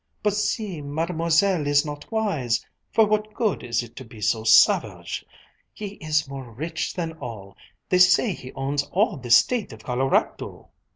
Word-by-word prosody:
"But 210 -1 +2
see, 205 -4 -2
Mademoiselle 165 +3 +1
is 145 +1 +3
not 145 +5 -8
wise! 190 - 0 0.3
For 220 - +5
what 215 0 -1
good 220 -6 0
is 115 -1 -1
it 115 - -13
to 130 - -7
be 115 -2 -14
so 110 +1 0
savage! 110 0 +3 0.5
He 210 -1 -5
is 155 -2 0
more 135 -3 -8
rich 160 +8 -4
than 165 -2 -3
all! 100 -5 -8 0.3
They 180 - +2
say 185 +4 +5
he 130 -5 -10
owns 140 +1 -1
all 200 +1 0
the 125 -2 -9
State 220 - +4
of 110 0 -13
Colorado!" 130 +2 -1
150 Hz, 165 wpm, -24 LUFS, 125-195 Hz, 0.5 s, For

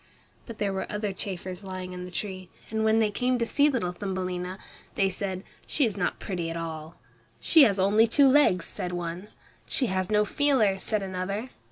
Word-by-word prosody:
But 230 -3 -8
there 200 -2 -1
were 190 - -4
other 210 -1 -2
chafers 185 -1 -5
living 185 -1 -6
in 180 0 -6
the - - -8
tree, 185 -1 -5 0.2
and 220 0 0
when 220 0 +4
they 220 -2 +2
came 250 +4 +1
to 235 - 0
see 285 +5 +3
little 230 -11 -1
Thumbelina, 185 -1 -4 0.4
they 195 -1 +2
said, 190 0 -4 0.2
"She 290 - +2
is 215 -4 -1
not 185 -3 -1
pretty 175 -4 -3
at 165 - -4
all." 160 -1 -6 0.4
"She 315 -4 +6
has 205 -4 +2
only 210 +4 +4
two 275 +4 +5
legs," 260 - +4
said 180 0 -5
one. 175 +2 -4 0.4
"She 265 - 0
has 185 0 -1
no 210 0 +3
feelers," 220 -7 +3
said 215 -2 0
another. 195 +5 -4
195 Hz, 195 wpm, -27 LUFS, 180-220 Hz, 0.4 s, She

